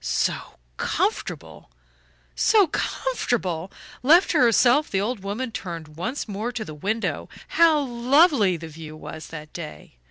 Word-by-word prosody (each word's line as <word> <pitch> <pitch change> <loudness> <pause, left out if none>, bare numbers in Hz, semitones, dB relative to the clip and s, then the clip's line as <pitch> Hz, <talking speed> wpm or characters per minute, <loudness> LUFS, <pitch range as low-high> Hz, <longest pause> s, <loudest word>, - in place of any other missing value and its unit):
So - - -1 0.2
comfortable - - -2 0.6
so 425 -3 +4
comfortable! 205 - -2 0.3
Left 325 +8 +5
to 320 - +2
herself 250 +4 +4
the 195 - 0
old 220 +3 -2
woman 210 +6 -4
turned 170 -7 -6
once 240 - -4
more 215 +4 -3
to 225 -2 -4
the 155 - -8
window. 210 +9 -2 0.2
How 325 -3 +4
lovely 250 - +3
the 165 0 -8
view 155 0 -10
was 155 0 -8
that 150 -1 -9
day! 115 - -9
220 Hz, 135 wpm, -24 LUFS, 170-265 Hz, 0.6 s, Left